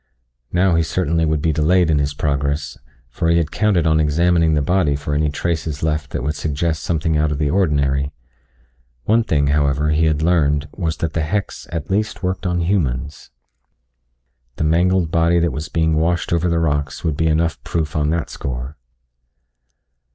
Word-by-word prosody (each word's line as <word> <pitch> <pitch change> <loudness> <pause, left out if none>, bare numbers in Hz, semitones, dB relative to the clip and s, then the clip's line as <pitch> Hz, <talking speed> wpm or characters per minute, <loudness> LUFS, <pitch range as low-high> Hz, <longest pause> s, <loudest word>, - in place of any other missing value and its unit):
Now 90 0 +2
he 85 - +3
certainly 80 0 0
would 75 -1 0
be 80 - +2
delayed 80 +3 +3
in 75 - +2
his 70 0 -1
progress, 70 0 -1 0.3
for 70 +7 -2
he 85 - +4
had 85 -3 0
counted 105 -6 +1
on 80 -1 +3
examining 80 +1 +2
the 75 - +2
body 85 -3 +1
for 70 +1 -4
any 75 +1 +1
traces 80 -1 -3
left 75 -2 -1
that 60 - -4
would 75 +3 -1
suggest 80 +1 -2
something 80 -1 0
out 75 0 +1
of 75 - -2
the 75 -1 0
ordinary. 70 -6 +1 0.9
One 115 - +3
thing, 70 -8 +1
however, 75 +1 +1
he 80 +2 +2
had 80 -1 +1
learned 75 -3 +2
was 80 -4 -2
that 80 -2 -3
the 80 - 0
hex 100 +6 -3
at 85 0 -4
least 105 +1 -1
worked 95 +1 -2
on 90 -1 0
humans. 75 -6 -2 1.3
The - - -2
mangled 85 +2 +2
body 85 +1 +3
that 85 -1 +2
was 75 +3 -5
being 80 -1 +1
washed 85 +2 0
over 85 +1 +1
the 85 - +1
rocks 75 -4 -1
would 80 -3 0
be 80 +2 0
enough 80 +1 0
proof 80 -4 -3
on 75 -1 +1
that 85 0 -2
score. 65 +2 -5
80 Hz, 180 wpm, -19 LUFS, 75-85 Hz, 1.3 s, he